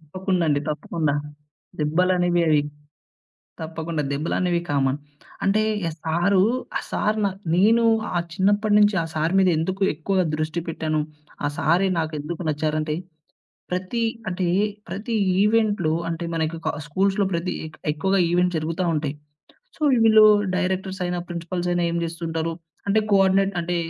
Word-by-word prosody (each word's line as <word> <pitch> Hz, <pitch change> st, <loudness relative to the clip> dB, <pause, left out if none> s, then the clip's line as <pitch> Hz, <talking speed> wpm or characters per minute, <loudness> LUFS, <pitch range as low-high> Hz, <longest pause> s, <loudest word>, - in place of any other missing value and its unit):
తప్పకుండా 180 Hz, +3 st, -2 dB
అండి. 145 Hz, -1 st, +2 dB
తప్పకుండా. 150 Hz, -1 st, -1 dB, 0.7 s
దెబ్బలనేవి 175 Hz, +2 st, +2 dB
అవి 150 Hz, -2 st, +4 dB, 1.0 s
తప్పకుండా 160 Hz, -1 st, -3 dB
దెబ్బలనేవి 170 Hz, +4 st, 0 dB
కామన్. 140 Hz, -1 st, +1 dB, 0.5 s
అంటే 205 Hz, +2 st, +3 dB, 0.3 s
ఆ -, -, -2 dB
సారు 175 Hz, +4 st, +2 dB, 0.4 s
ఆ -, -, -2 dB
సారు 210 Hz, +1 st, 0 dB
నా 200 Hz, -, +2 dB, 0.2 s
నేను 225 Hz, +5 st, +4 dB, 0.3 s
ఆ -, -, +3 dB, 0.2 s
చిన్నప్పటినుంచి 205 Hz, +1 st, +3 dB
ఆ -, -, -3 dB
సారు 160 Hz, +4 st, 0 dB
మీద 190 Hz, -1 st, +4 dB
ఎందుకు 190 Hz, +4 st, -2 dB
ఎక్కువగా 185 Hz, +4 st, 0 dB
దృష్టి 155 Hz, +2 st, -2 dB
పెట్టాను. 155 Hz, -1 st, -1 dB, 0.4 s
ఆ -, -, +2 dB
సారే 180 Hz, +5 st, +3 dB
నాకేందుకు 155 Hz, +2 st, -3 dB
నచ్చారంటే 155 Hz, 0 st, -1 dB, 0.8 s
ప్రతి 185 Hz, +6 st, -2 dB, 0.3 s
అంటే 180 Hz, -1 st, -1 dB, 0.4 s
ప్రతి 220 Hz, +4 st, -4 dB, 0.3 s
ఈవెంట్‌లో 210 Hz, -6 st, +2 dB, 0.2 s
అంటే 165 Hz, +1 st, -3 dB
మనకి 160 Hz, 0 st, -1 dB
కా -, -, +1 dB
స్కూల్స్‌లో 195 Hz, +6 st, +1 dB
ప్రతి 170 Hz, +2 st, -1 dB, 0.4 s
ఎక్కువగా 190 Hz, +5 st, +1 dB
ఈవెంట్స్ 180 Hz, -1 st, +2 dB
జరుగుతా 165 Hz, +4 st, -2 dB
ఉంటాయి. 150 Hz, -1 st, -2 dB, 0.6 s
సో, -, -, -24 dB, 0.2 s
వీళ్ళు 220 Hz, -1 st, +7 dB, 0.3 s
డైరెక్టర్స్ 190 Hz, +1 st, -2 dB
అయినా 175 Hz, 0 st, -2 dB
ప్రిన్సిపల్స్ 175 Hz, +1 st, -3 dB
అయినా 175 Hz, 0 st, +1 dB
ఏం 170 Hz, -, -2 dB
జేస్తూంటారు? 165 Hz, 0 st, -3 dB, 0.4 s
అంటే 215 Hz, +2 st, +4 dB
కోఆర్డినేట్ 195 Hz, 0 st, +4 dB
అంటే 175 Hz, +1 st, -2 dB
175 Hz, 130 wpm, -23 LUFS, 160-195 Hz, 1.0 s, వీళ్ళు